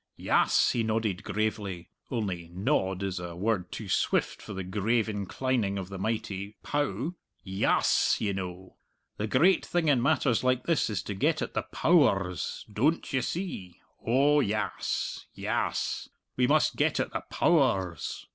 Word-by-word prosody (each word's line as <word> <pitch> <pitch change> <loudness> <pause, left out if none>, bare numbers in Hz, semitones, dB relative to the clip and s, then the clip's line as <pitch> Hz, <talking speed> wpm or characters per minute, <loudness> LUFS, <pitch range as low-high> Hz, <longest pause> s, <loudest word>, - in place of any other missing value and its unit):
"Yass," - - +3
he 120 - 0
nodded 110 -3 -1
gravely 105 -4 -3 0.2
only 95 -8 -3
"nod" 95 0 0
is 95 -2 -2
a 85 -1 -6
word 95 -1 -1
too - - -6
swift - - 0
for - - -9
the 95 - -4
grave 105 +5 0
inclining 105 +1 -1
of 95 -1 -5
that 95 -1 -6
mighty 100 -1 -3
pow 145 - -1 0.3
"yass, 95 0 +2
ye 100 -2 0
know, 95 -1 -6 0.4
the 105 - -2
great 165 - +4
thing 175 -2 0
in 135 -4 +4
matters 135 -3 +2
like 130 -1 +2
this 165 -7 +2
is 105 -4 -2
to 100 - -4
get 150 +10 +1
at - - -4
the - - 0
Pow 165 -3 +5
ers, 90 -3 -4
doan't 150 +9 +1
you 130 - +2
see? 120 - -4 0.2
Oh 140 +5 +4
yass, 105 -4 -2
yass; - - -2 0.3
we 125 -1 +3
must 155 +2 +3
get - - +2
at - - -2
the - - -2
Pow 170 -2 +3
ers!" 95 - -1
110 Hz, 160 wpm, -28 LUFS, 95-130 Hz, 0.4 s, Pow